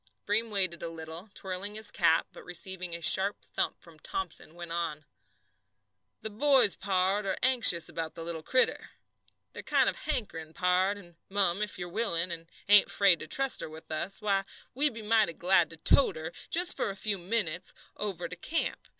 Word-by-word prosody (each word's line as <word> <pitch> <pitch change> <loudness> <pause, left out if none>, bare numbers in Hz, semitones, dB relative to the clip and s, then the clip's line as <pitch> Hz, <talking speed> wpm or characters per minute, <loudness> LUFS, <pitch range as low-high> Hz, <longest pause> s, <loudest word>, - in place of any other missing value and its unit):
Breem 220 +3 +2
waited 185 -5 +3
a 170 - -4
little, 165 +4 -8
twirling 190 +2 -3
his 215 -1 0
cap, 165 -2 +2
but - - -12
receiving 180 0 -4
a 170 - -8
sharp 195 +4 +3
thump - - -2
from - - -17
Thomson, 385 - -5
went 175 -1 -8
on: 165 -3 -2 1.2
"The 220 - -5
boys, 265 -2 +4
pard, 195 +1 0
are 190 - -1
anxious 235 -10 +4
about 160 -1 -5
the 165 - -6
little 165 -1 -3
critter. 255 +10 0 0.6
They're - - -7
kind - - +2
of - - -1
hankering, 195 - -4
pard, 185 +2 +1
and, 175 -4 -15
mum, 195 -1 +1
if 210 -1 -3
you 175 - -5
are - - -13
willin', 175 -5 0
and 165 0 -7 0.2
ain't 205 0 +7
'fraid 195 -5 +4
to 155 - -8
trust 270 +9 +1
her - - -6
with 160 +1 -12
us, 170 +5 -2
why, 195 -2 +1 0.3
we'd 285 -1 +1
be 225 - -7
mighty 215 -4 +2
glad 175 -2 +2
to 165 - -10
tote 270 - +4
her 160 +2 -7 0.2
just 355 +2 +4
for - - -2
a 195 - -6
few 200 0 -2
minutes 180 -3 -2 0.2
over 185 -5 -4
to 180 - -8
camp. 325 - -3
190 Hz, 190 wpm, -29 LUFS, 170-210 Hz, 1.2 s, ain't